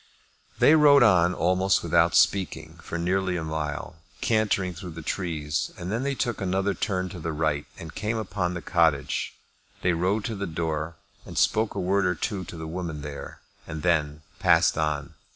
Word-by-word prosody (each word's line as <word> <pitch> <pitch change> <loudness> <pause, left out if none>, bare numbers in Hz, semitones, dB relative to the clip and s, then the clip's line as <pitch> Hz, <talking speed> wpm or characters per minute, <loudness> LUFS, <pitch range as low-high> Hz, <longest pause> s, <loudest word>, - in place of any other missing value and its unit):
They 150 - +6
rode 145 -4 +7
on 90 -5 +4
almost 95 +2 +2
without 85 -3 +3
speaking 95 +5 +1
for 85 - -5
nearly 90 +1 0
a 80 - -3
mile, 80 +1 -4 0.2
cantering 105 -5 +1
through 85 +1 -8
the 85 - -6
trees, 75 -5 -2
and 90 +2 -5
then 115 +3 -1
they 140 +1 -1
took 120 -5 -2
another 95 +1 0
turn 95 -3 -2
to 90 - -8
the 80 0 -3
right, 75 -2 -1
and 80 0 -9
came 110 +1 -2
upon 95 -4 -2
the 85 - -6
cottage. 80 -5 +1 0.5
They 90 - +3
rode 95 +5 0
to 115 - -2
the 100 0 -3
door, 80 0 -3 0.3
and - - -10
spoke 110 0 +2
a - - -2
word 95 +1 +2
or 90 - +1
two 95 +3 -3
to 85 - -9
the 80 - -6
woman 80 -3 -5
there, 70 -1 -8 0.3
and 80 -2 -6
then 75 -3 +1 0.2
passed - - +4
on. 75 -2 -2
90 Hz, 185 wpm, -26 LUFS, 80-95 Hz, 0.5 s, rode